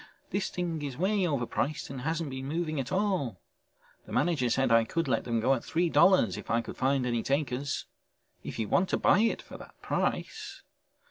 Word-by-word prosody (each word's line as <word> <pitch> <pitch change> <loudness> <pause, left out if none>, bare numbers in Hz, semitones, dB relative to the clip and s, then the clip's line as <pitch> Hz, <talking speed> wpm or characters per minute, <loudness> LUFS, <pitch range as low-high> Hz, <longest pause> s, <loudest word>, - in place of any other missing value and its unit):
This 200 -1 -1
thing 170 -3 -3
is 140 -3 -5
way 190 +3 +2
overpriced 140 +1 -2
and 135 -2 -6
hasn't 160 +1 -2
been 130 0 -5
moving 155 0 -2
at 135 +3 -4
all. 185 - 0 0.7
The - - -11
manager 145 -8 +1
said 135 +1 +2
I 115 0 +6
could 165 +7 -2
let 115 -4 0
them 115 -2 0
go 130 +4 +3
at 125 - -2
three 170 +1 0
dollars 150 - +5
if - - -9
I 115 +1 +2
could - - -8
find 135 0 +1
any 120 -2 0
takers. 140 0 -1 0.6
If - - -6
you 110 - -1
want 185 - +2
to - - +1
buy 185 - +4
it 225 +1 +1
for - - -11
that - - -14
price...." 410 -3 -2
140 Hz, 200 wpm, -29 LUFS, 125-175 Hz, 0.7 s, I